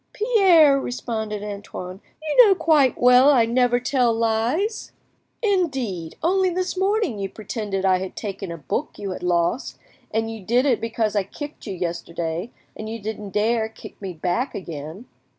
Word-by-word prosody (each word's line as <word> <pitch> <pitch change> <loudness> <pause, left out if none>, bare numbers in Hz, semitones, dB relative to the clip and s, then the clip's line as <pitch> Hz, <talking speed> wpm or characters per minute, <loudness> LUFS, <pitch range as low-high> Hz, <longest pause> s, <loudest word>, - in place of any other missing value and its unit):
"Pierre," 370 - +5
responded 220 -5 -4
Antoine, 200 -2 -7 0.3
"you 405 +12 +7
know 390 - +5
quite 305 -7 +3
well 250 +3 +7
I 250 -6 +5
never 245 +1 +2
tell 245 -1 +2
lies." 230 - -1 0.5
"Indeed!—only 330 - 0
this 365 +1 -2
morning 385 - 0
you 195 -1 -3
pretended 205 -2 -4
I 185 -1 +4
had 190 0 -6
taken 195 -3 -5
a 170 - -6
book 140 -5 -4
you 200 -2 -4
had 185 - -6
lost, 175 +7 0 0.3
and 225 +1 -1
you 220 -3 -8
did 240 +7 +2
it 250 -5 +2
because 225 -1 -1
I 205 - +3
kicked 290 +8 -9
you 195 - -4
yesterday, 170 +1 -4 0.3
and 215 0 -6
you 225 - -4
didn't 210 -1 -6
dare 220 +3 +1
to - - -27
kick - - -11
me 195 -2 -4
back 180 - -2
again." 165 - -7
225 Hz, 165 wpm, -23 LUFS, 195-275 Hz, 0.5 s, you